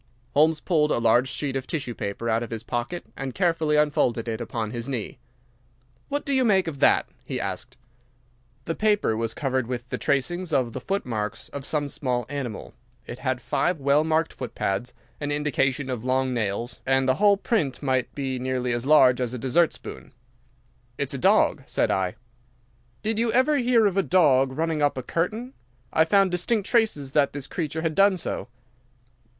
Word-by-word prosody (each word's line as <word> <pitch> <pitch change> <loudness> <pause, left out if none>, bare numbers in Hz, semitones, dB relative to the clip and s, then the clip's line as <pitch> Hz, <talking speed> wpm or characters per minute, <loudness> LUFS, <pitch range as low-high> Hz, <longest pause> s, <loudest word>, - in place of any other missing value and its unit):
Holmes 155 +2 +4
pulled 150 -3 +1
a - - +1
large 120 +3 +3
sheet 140 -1 -3
of 130 -1 -3
tissue 145 -7 -3
paper 105 +1 -4
out 115 0 +1
of 120 - -5
his 115 -1 -5
pocket 120 +7 -3
and 135 -1 -5
carefully 165 -4 +1
unfolded 145 -6 +1
it 115 +1 -3
upon 115 -2 -3
his 120 +2 -4
knee. 125 -2 -4 0.9
"What 285 +1 -2
do 280 - 0
you 260 -1 +3
make 195 -6 +3
of 145 -4 -5
that?" - - +4 0.2
he - - -3
asked. - - -5 0.9
The 165 - -1
paper 205 - +1
was 115 0 -2
covered 130 -3 -1
with 125 -1 -4
the - - -3
tracings 170 +6 -1
of 125 -6 +1
the - - -5
footmarks 115 - -3
of 140 -1 -7
some 145 -2 0
small 125 -4 -1
animal. 135 -7 -5 0.3
It 120 - -8
had 130 -2 -2
five 175 -2 0
well 140 +2 +3
marked 160 +1 0
footpads, 120 -2 -3 0.3
an 145 -1 -3
indication 140 -2 0
of 125 -4 -4
long 130 0 +1
nails, 115 +1 -3
and 135 0 +2
the 130 - +2
whole 205 -1 +6
print 160 - -1
might 130 -2 0
be 135 -2 -2
nearly 125 -1 -1
as 120 +2 -3
large 130 -5 +6
as 125 0 -2
a - - -3
dessert 145 +7 +2
spoon. - - -10 0.8
"It's 140 -1 -2
a 135 - -3
dog," - - +3
said - - +1
I. 95 -1 0 0.9
"Did 220 0 0
you 230 0 +2
ever 270 +4 +3
hear 240 -3 +3
of 200 -2 +1
a - - +5
dog 135 -6 +3
running 160 -1 0
up 145 -2 +2
a 130 - -3
curtain? 220 - -2 0.4
I 160 - +4
found 195 +2 +3
distinct 195 +4 0
traces 210 - +1
that 145 0 +2
this 140 -2 -6
creature 160 -1 -3
had 165 -1 0
done 195 +2 +4
so." 170 - -4
140 Hz, 185 wpm, -25 LUFS, 125-165 Hz, 0.9 s, whole